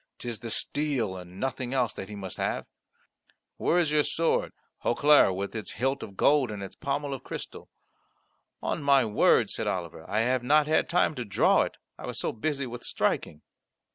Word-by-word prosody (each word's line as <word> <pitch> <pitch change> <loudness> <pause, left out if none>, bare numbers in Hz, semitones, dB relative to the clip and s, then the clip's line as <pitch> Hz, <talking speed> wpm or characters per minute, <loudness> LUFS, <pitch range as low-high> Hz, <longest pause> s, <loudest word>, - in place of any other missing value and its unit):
'Tis 120 -3 -5
the 115 - -6
steel 130 -6 0
and 90 +1 -10
nothing 130 -1 -2
else 125 -4 +1
that 95 - -7
he 105 - -7
must 95 -3 -6
have. - - -2 0.9
Where 175 - +2
is 165 -4 +2
your 150 0 +4
sword 165 +2 0 0.3
Hautclere, 145 -3 +5
with 100 +2 -4
its 110 -2 -5
hilt 135 +4 -1
of 100 -2 -9
gold 140 -4 +4
and 105 -2 -5
its 95 - -8
pommel 140 0 -2
of 135 - -7
crystal?" - - -8 0.9
"On - - -1
my 140 -3 +4
word," 105 -1 +3
said - - -3
Oliver, 85 -3 -3
"I 105 +2 +1
have 125 +2 +1
not 150 +4 +4
had 155 +1 +2
time 170 -2 +3
to 125 - -4
draw 105 - +3
it; - - -3 0.2
I - - -7
was - - -5
so - - -1
busy 140 +4 -2
with 120 -1 -7
striking." 75 - -1
125 Hz, 190 wpm, -28 LUFS, 105-145 Hz, 0.9 s, Hautclere